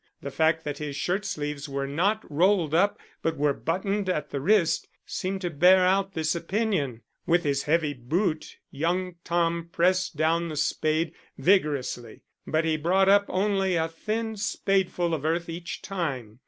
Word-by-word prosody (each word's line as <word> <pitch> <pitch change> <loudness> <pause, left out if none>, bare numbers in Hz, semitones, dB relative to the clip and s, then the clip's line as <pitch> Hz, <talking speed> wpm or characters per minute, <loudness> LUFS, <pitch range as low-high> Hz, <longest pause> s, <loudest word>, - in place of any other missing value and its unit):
The 140 - -5
fact 160 +2 +2
that 145 -1 -4
his 150 -2 -4
shirt 185 +8 -1
sleeves 150 -5 -4
were 140 0 -2
not 190 +10 0
rolled 170 0 +2
up 200 +5 +3 0.2
but 165 -1 -1
were 145 0 +2
buttoned 195 +6 -2
at 150 -5 -2
the 140 - -3
wrist 185 +1 +2 0.2
seemed 190 +1 -3
to 175 -2 -2
bear 180 +5 +5
out 195 +1 +1
this 160 -1 0
opinion. 170 - -1 0.2
With 175 +1 +3
his 140 -2 +1
heavy 155 -1 +1
boot 155 - -2
young 175 +4 -1
Tom 170 0 0
pressed 185 0 +1
down 165 +2 +1
the 155 - -5
spade 155 +2 0 0.2
vigorously, 145 - 0 0.2
but 160 +1 +1
he 160 -1 +1
brought 185 +5 +3
up 200 0 +5
only 195 -1 +1
a 160 -1 +1
thin 220 +6 -3
spadeful 190 -4 0
of 150 -3 -2
earth 165 +2 0
each 170 +1 -6
time. 135 - -4
170 Hz, 165 wpm, -26 LUFS, 150-190 Hz, 0.2 s, bear